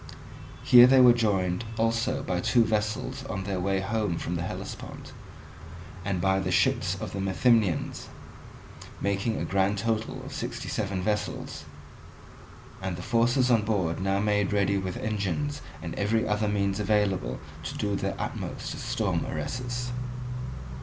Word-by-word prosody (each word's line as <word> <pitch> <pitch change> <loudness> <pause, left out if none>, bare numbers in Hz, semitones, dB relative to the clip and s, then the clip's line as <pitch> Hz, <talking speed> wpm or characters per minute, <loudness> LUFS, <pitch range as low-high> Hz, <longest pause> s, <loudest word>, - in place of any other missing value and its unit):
Here 120 0 +9
they 130 +1 +6
were 125 -1 +8
joined 100 -4 +1
also 115 +4 +1
by 90 -6 -1
two 120 +6 +4
vessels 105 -1 -1
on 95 0 -4
their 95 -1 -2
way 95 +1 0
home 105 -3 -1
from 85 - -3
the 85 - -2
Hellespont, 85 - -6 0.9
and 95 -1 -1
by 95 +1 +2
the 95 - -2
ships - - +2
of - - -5
the 100 - -3
Methymnians, 95 -1 +1 0.9
making 100 +3 0
a - - -2
grand 100 +1 +1
total 110 +1 -2
of - - -8
sixty - - -4
seven 100 -3 -2
vessels; 105 0 -2 1.2
and 95 -2 -2
the 90 - -7
forces 120 +4 +3
on 115 -2 +5
board 95 -6 0
now 95 +1 +1
made 105 -1 +1
ready 100 -1 +2
with 95 -1 -4
engines 110 +8 -2 0.2
and 85 - -4
every 110 +3 +1
other 105 0 +1
means 100 -1 0
available 105 -2 +1 0.2
to 80 - -5
do 105 -1 0
their - - -2
utmost - - -4
to - - -5
storm - - -1
Eresus. 125 0 -3
105 Hz, 150 wpm, -27 LUFS, 95-115 Hz, 1.2 s, Here